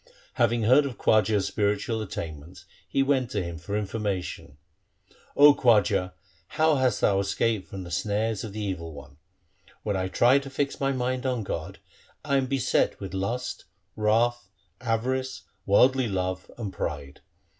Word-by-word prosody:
Having 115 0 +2
heard 130 +6 +5
of 130 - -8
Khwaja's 105 -2 +3
spiritual 105 +2 -1
attainments 80 -4 -7 0.2
he 135 - +1
went 135 -3 +1
to 105 -6 -2
him 85 -2 -6
for 100 +5 -3
information, 95 -7 -4 0.4
' - - -30
O 145 0 +9
Khwaja, 105 -7 +3 0.3
how 155 - +2
hast 130 -2 +1
thou 100 -1 +3
escaped 100 +1 0
from 95 -1 -7
the 85 - -9
snares 105 +4 -1
of 110 - -6
the 105 +2 -5
evil 85 -5 -4
one? 70 -1 -12 0.7
When 105 -2 -1
I 95 0 -1
try 120 +8 +4
to 135 0 -9
fix 140 +1 -2
my 135 0 +1
mind 130 0 -1
on 125 -4 -1
God, 80 -4 -5 0.5
I 140 -2 +2
am 135 -1 0
beset 130 -1 +1
with 95 -2 -7
lust, 115 +7 -3 0.3
wrath, 115 0 +1 0.3
avarice, 130 +2 -2 0.2
worldly 130 +5 +4
love, 95 -2 -3
and 105 -5 -5
pride. 70 -1 -5
110 Hz, 155 wpm, -26 LUFS, 95-130 Hz, 0.7 s, O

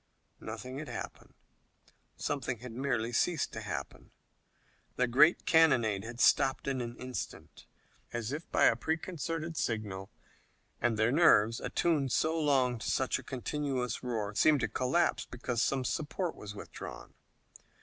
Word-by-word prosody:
Nothing 125 +5 -6
had 155 - -6
happened. 120 -3 -8 0.8
Something 130 -3 -2
had 125 +2 -9
merely 120 -2 -1
ceased 160 +5 +1
to - - -5
happen. - - -6 0.9
The 125 - +2
great 150 +8 +5
cannonade 120 - +4
had 120 +1 -8
stopped 135 +2 +3
in 135 -2 0
an 120 0 -6
instant, 130 0 -7 0.4
as 120 0 -3
if 155 +3 -5
by - - +2
a - - +5
preconcerted 165 0 -3
signal, 105 -4 -2 0.7
and 120 -2 +1
their 110 +2 +3
nerves, 115 -8 +5
attuned 150 -6 0
so 160 +5 +2
long 130 -5 +2
to - - -3
such 130 -1 +1
a - - -10
continuous 130 0 -3
roar, 110 -5 -3
seemed 150 +5 +4
to 120 - +1
collapse, 130 +10 +1
because 120 -1 -2
some 130 +1 +1
support 160 +6 -2
was 105 0 -9
withdrawn. - - -9
130 Hz, 140 wpm, -31 LUFS, 115-150 Hz, 0.9 s, great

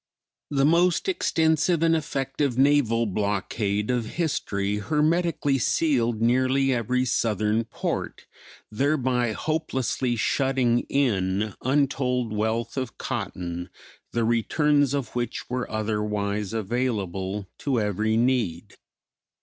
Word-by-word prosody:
The 140 -2 +2
most 170 - +3
extensive 160 - +2
and 165 0 +4
effective 140 -4 -2
naval 130 -4 +3
blockade 105 +1 -1
of 120 -3 -1
history 105 -11 -1
hermetically 150 - +1
sealed 120 -6 +1
nearly 130 +3 +3
every 125 +2 0
Southern 110 0 +1
port, - - -4 0.5
thereby 125 -2 +1
hopelessly 130 -4 -1
shutting 125 0 +1
in 105 -6 +1
untold 130 -3 0
wealth 110 +3 -1
of 130 -3 -3
cotton, 90 0 -4 0.4
the 115 - 0
returns 145 +5 +2
of 140 -3 -2
which 120 -2 -3
were 125 0 -2
otherwise 105 -2 -2
available 105 -4 -2
to 135 -4 0
every 110 +1 0
need. 115 -7 0
120 Hz, 100 wpm, -25 LUFS, 105-140 Hz, 0.5 s, and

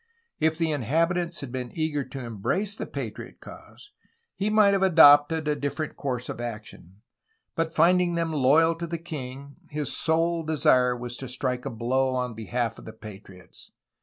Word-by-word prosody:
If 160 0 +1
the 165 -2 0
inhabitants 165 - 0
had 140 -3 -7
been 125 -1 -4
eager 155 -3 -1
to 135 -1 -8
embrace 185 - -2
the - - -6
patriot - - -7
cause 415 - -14 0.4
he 200 +2 -2
might 210 -2 +5
have 195 - +1
adopted 155 -3 +6
a 150 - +1
different 145 +2 -4
course 125 -3 -4
of - - -6
action, 105 -4 -9 0.5
but 165 0 -2
finding 175 +1 +3
them 165 -1 -1
loyal 155 +4 +4
to 170 0 -5
the 170 +1 -3
king 140 -4 -8
his 150 -1 -4
sole 165 +1 +1
desire 130 -5 +2
was 120 0 -5
to 130 - -7
strike 125 0 -2
a - - -2
blow 130 +3 0
on 125 -2 -2
behalf 115 +1 -3
of - - -13
the 110 - -9
patriots. 100 -4 -13
145 Hz, 170 wpm, -26 LUFS, 125-165 Hz, 0.5 s, adopted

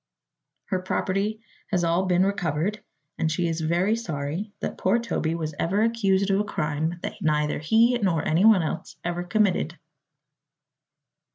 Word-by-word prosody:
Her 185 - 0
property 195 +3 -1 0.3
has 180 -4 +1
all 170 +3 +1
been 180 +1 +3
recovered 195 +1 -1 0.4
and 160 - +1
she 170 +2 0
is 165 0 -2
very 175 +7 +2
sorry 170 -1 -4
that - - -4
poor 190 +5 +3
Toby 200 -9 -1
was 155 -2 -3
ever 195 +6 +1
accused 200 -4 +2
of 195 - +3
a - - +2
crime 160 -3 -2
that - - -5
neither 150 -1 +1
he 225 +11 +4
nor 180 -7 0
anyone 185 +3 +5
else 155 - -4
ever 175 0 -2
committed." 180 -3 +1
180 Hz, 150 wpm, -25 LUFS, 160-205 Hz, 0.4 s, anyone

